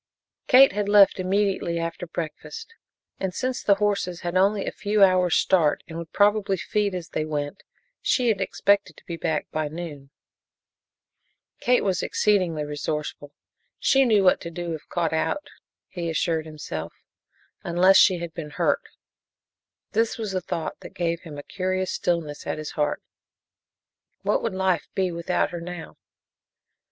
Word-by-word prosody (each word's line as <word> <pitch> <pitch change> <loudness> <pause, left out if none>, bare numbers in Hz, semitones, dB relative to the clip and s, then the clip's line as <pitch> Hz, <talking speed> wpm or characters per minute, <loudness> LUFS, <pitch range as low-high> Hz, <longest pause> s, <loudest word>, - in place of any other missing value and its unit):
Kate 270 0 +8
had 205 +1 -2
left 205 -2 +6
immediately 190 -2 0
after 165 +1 -4
breakfast, 175 - -6 0.5
and 190 -2 -3
since 255 0 -2
the 200 - +4
horses 200 -4 -1
had 175 +1 -3
only 195 +2 +3
a - - -2
few 205 0 +2
hours' 185 -2 +4
start 165 -6 +3
and 165 - -9
would 165 -1 -8
probably 205 -1 +3
feed 205 +1 -1
as 175 -2 -6
they 155 - -2
went, 150 +3 -4 0.4
she 250 -3 +2
had 205 -3 +1
expected 200 +1 +1
to - - -18
be 170 - -5
back 160 -2 -1
by 155 -1 -1
noon. 150 -3 -7 1.5
Kate 250 0 +3
was 190 -2 0
exceedingly 180 -8 +1
resourceful 150 0 -4 0.5
she 270 0 +4
knew 215 -6 +4
what 185 - +4
to 170 - -5
do 170 0 -4
if 155 - -8
caught 170 -2 -1
out, 225 - -1 0.4
he 170 -2 -4
assured 160 0 0
himself, 85 - -6 0.7
unless 180 +3 +5
she 185 -2 +6
had 170 -1 -6
been 155 -3 -6
hurt. - - +1 1.1
It 225 +1 +1
was 220 -3 -3
this 185 -2 -2
thought 160 - -4
that - - -12
gave 170 -1 -1
him 155 -4 -9
a 145 - -7
curious 185 +1 -2
stillness 165 -4 -2
at - - -2
his 155 -1 -5
heart. 150 -1 -1 1.2
What - - +1
would 230 -5 -2
life 190 -4 +1
be 185 -2 +1
without 170 +1 -1
her 175 -1 -5
now? 175 -1 -8
180 Hz, 160 wpm, -25 LUFS, 160-200 Hz, 1.5 s, Kate